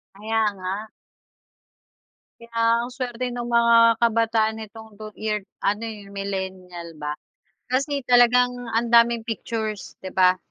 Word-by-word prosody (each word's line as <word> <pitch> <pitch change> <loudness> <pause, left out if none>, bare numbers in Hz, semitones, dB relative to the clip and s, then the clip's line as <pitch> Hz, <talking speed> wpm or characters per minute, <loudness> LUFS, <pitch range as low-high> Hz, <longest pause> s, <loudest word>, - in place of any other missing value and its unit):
Kaya 220 +2 -1
nga. 195 +3 -5 1.5
Kaya, 230 0 +1
ang - - -9
suwerte 255 -1 -3
no'ng 240 0 -4
mga 235 0 +5 0.2
kabataan 225 -1 +2
nitong 220 0 -12
two-year 215 0 -4 0.2
ano, 205 +2 -1
eh, 215 -3 -7
millenial 190 -3 -6
ba. 150 0 -5 0.5
Kasi, 275 +1 0
talagang 245 0 +5 0.2
ang 235 +1 0
daming 235 -1 +5
pictures, 220 -2 -4
'di 185 - -6
ba? 185 -1 +4
220 Hz, 120 wpm, -23 LUFS, 200-235 Hz, 1.5 s, mga